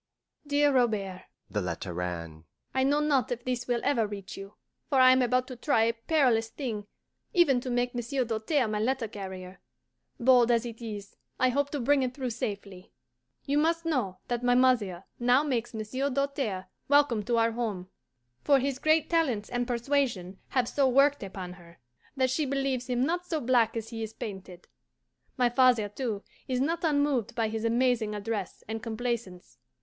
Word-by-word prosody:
DEAR 290 0 +3
ROBERT 210 -7 0 0.3
(the 105 - -1
letter 90 0 -4
ran): 85 -3 -5 0.3
I 260 - +2
know 290 +2 +2
not 280 -6 +1
if 240 0 -3
this 250 -1 -2
will 240 -1 0
ever 235 -6 +2
reach 200 -2 -7
you, 195 +1 -10 0.3
for 275 -3 +3
I 255 0 +8
am 255 0 +4
about 250 +1 +1
to 255 - -6
try 240 -1 +2
a 230 +1 +2
perilous 230 -2 +2
thing, 220 -7 -5 0.5
even 285 -8 +4
to 255 - -5
make 245 0 0
Monsieur 245 +2 -1
Doltaire 230 +4 0
my 210 -1 -2
letter 245 +1 0
carrier. 190 -3 -8 0.6
Bold 245 -1 +5
as 235 0 +2
it 230 0 -8
is, 205 -3 -7 0.2
I 255 - +4
hope 285 +3 0
to 290 - -3
bring 275 +3 +3
it 255 -1 -2
through 260 -3 -3
safely. 200 -4 -6 0.5
You 285 +1 +1
must 330 +2 +1
know 250 - -1
that 240 -1 -1
my 245 0 +4
mother 230 -8 +2 0.2
now 245 +3 +4
makes 245 -6 -1
Monsieur 235 +5 -2
Doltaire 270 -8 -2 0.2
welcome 285 -6 +4
to 235 0 +1
our 230 0 +3
home, 215 -6 -3 0.6
for 280 - +5
his 270 0 -1
great 310 +1 +3
talents 270 -12 0
and 245 0 -1
persuasion 235 -7 -1
have 255 -3 0
so 275 0 +2
worked 275 +3 +4
upon 190 -2 -6
her 170 -1 -16 0.4
that 260 -1 +2
she 295 +2 0
believes 270 -2 -1
him 250 0 +1
not 350 +3 -2
so 320 -3 -1
black 235 -3 +2
as 225 0 -5
he 225 -1 -6
is 220 0 -5
painted. 190 -5 -8 0.7
My 250 -1 +4
father, 245 -4 +4
too, 210 -2 -4 0.2
is 255 -1 -1
not 330 +6 0
unmoved 285 -8 +1
by 225 -2 0
his 220 0 -4
amazing 230 -2 +1
address 205 -2 -4
and 220 +1 -4
complaisance. 230 - -4
240 Hz, 180 wpm, -28 LUFS, 215-270 Hz, 0.7 s, I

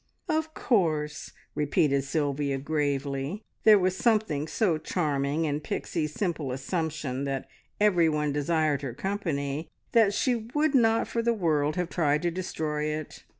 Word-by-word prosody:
"Of 315 0 -1
course," 155 - 0 0.2
repeated 145 -1 +2
Sylvia 140 -1 -1
gravely. 140 +4 -2 0.2
There 215 -1 +9
was 185 -1 +1
something 200 -10 +1
so 175 -4 +1
charming 150 -2 0
in 145 -1 -1
Pixie's 155 +1 -3
simple 160 -6 -2
assumption 140 -1 -2
that 135 -1 -3 0.3
everyone 165 -8 +3
desired 150 -1 +1
her 130 -4 -5
company, 160 -6 -2 0.2
that 225 -4 +5
she 230 +1 0
would 305 0 +2
not 225 -3 +4
for 230 - -1
the 235 0 +1
world 155 -6 +1
have 180 -1 -1
tried 150 -2 +1
to 175 - +1
destroy 155 -4 -2
it. 155 0 -4
155 Hz, 140 wpm, -28 LUFS, 145-190 Hz, 0.3 s, There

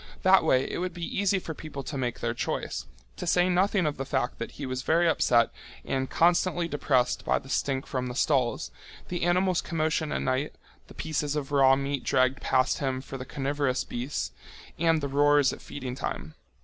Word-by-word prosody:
That - - +6
way 130 +1 +3
it - - -4
would 180 0 -3
be 170 -1 -4
easy 200 -1 +3
for 170 -3 -5
people 145 -3 -7
to 140 - -6
make 125 -3 -2
their - - 0
choice, - - -3 0.3
to - - -5
say 175 +1 +4
nothing 185 +1 +2
of 150 -1 -1
the 135 - -2
fact 130 -2 -2
that 115 - -5
he 145 - -6
was 130 0 -3
very 170 +5 +3
upset 120 -7 +3 0.3
and 130 0 -1
constantly 175 0 +2
depressed 135 -5 +1
by - - +2
the 135 - -9
stink 135 -1 -1
from 130 -2 -3
the 125 - -5
stalls, 130 -4 +1 0.4
the 175 - -3
animals' 180 +1 +2
commotion 155 -2 -1
at - - -1
night, 130 +3 -1 0.3
the - - -14
pieces 150 -2 -2
of 145 -1 -3
raw 135 -2 +6
meat 140 0 -2
dragged 130 +1 +2
past 130 0 +2
him 130 -2 -1
for 135 0 -8
the 130 - -6
carnivorous 140 -1 -1
beasts, 125 +5 -4 0.5
and 165 -1 +3
the 140 - -1
roars 145 0 +4
at - - -10
feeding 130 -3 -6
time. 75 - -5
140 Hz, 200 wpm, -27 LUFS, 130-165 Hz, 0.5 s, That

